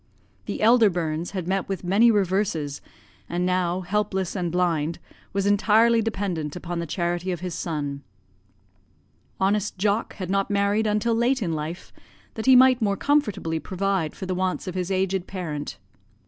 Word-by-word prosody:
The - - -3
elder 230 -1 +6
Burns 165 -2 -2
had 185 -4 -5
met 190 0 -1
with 195 -2 -3
many 200 +6 +4
reverses, 190 -8 0 0.5
and 175 +1 -1
now 180 0 0
helpless 190 0 -1
and 175 -3 -1
blind, 170 -2 0 0.3
was 195 0 -1
entirely 220 +3 +4
dependent 195 -9 -3
upon 175 -1 -4
the 170 - -3
charity 175 +2 -2
of 175 -2 -4
his 180 -2 -4
son. 145 -5 -3 1.4
Honest 200 +1 0
Jock 205 +4 0
had 185 -2 -5
not 195 0 +1
married 205 +2 +1
until 210 +2 +1
late 240 +2 +1
in 170 -4 -1
life, 155 +3 -5 0.4
that 220 +3 -5
he 260 - +8
might 255 -1 +6
more 200 -2 +1
comfortably 210 - 0
provide 190 -3 -1
for 190 - -6
the 185 - -2
wants 185 0 -1
of 185 - -3
his 180 0 -2
aged 190 -1 0
parent. 155 -6 -5
190 Hz, 160 wpm, -24 LUFS, 175-210 Hz, 1.4 s, he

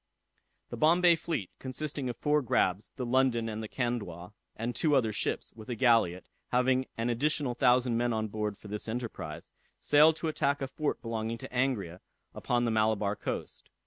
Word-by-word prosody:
The - - -5
Bombay 170 +2 +5
fleet, 155 - -3
consisting 135 0 -4
of 120 - -5
four 150 0 +2
grabs, 100 -5 0
the 125 - -3
London 120 -2 +2
and 110 0 -4
the 110 - -5
Candois, 105 -8 -3 0.2
and 115 +2 -3
two 150 -3 +2
other 115 -5 +2
ships, - - -2
with 110 0 -12
a 120 - -2
galliot, 115 -8 +3 0.2
having 130 +1 +2
an 115 +1 0
additional 140 +1 0
thousand 125 -1 +3
men 120 0 +1
on 110 -1 -1
board 105 -1 -3
for 105 - -13
this 105 +2 -5
enterprise, 115 +1 -5 0.3
sailed 150 +2 +5
to 160 0 -3
attack 145 -2 0
a 135 - -3
fort 150 +3 -3
belonging 115 0 -3
to - - -9
Angria 110 -9 0 0.3
upon 120 0 0
the 115 - +1
Malabar 110 -2 +1
coast. - - -5
120 Hz, 175 wpm, -30 LUFS, 110-135 Hz, 0.3 s, Bombay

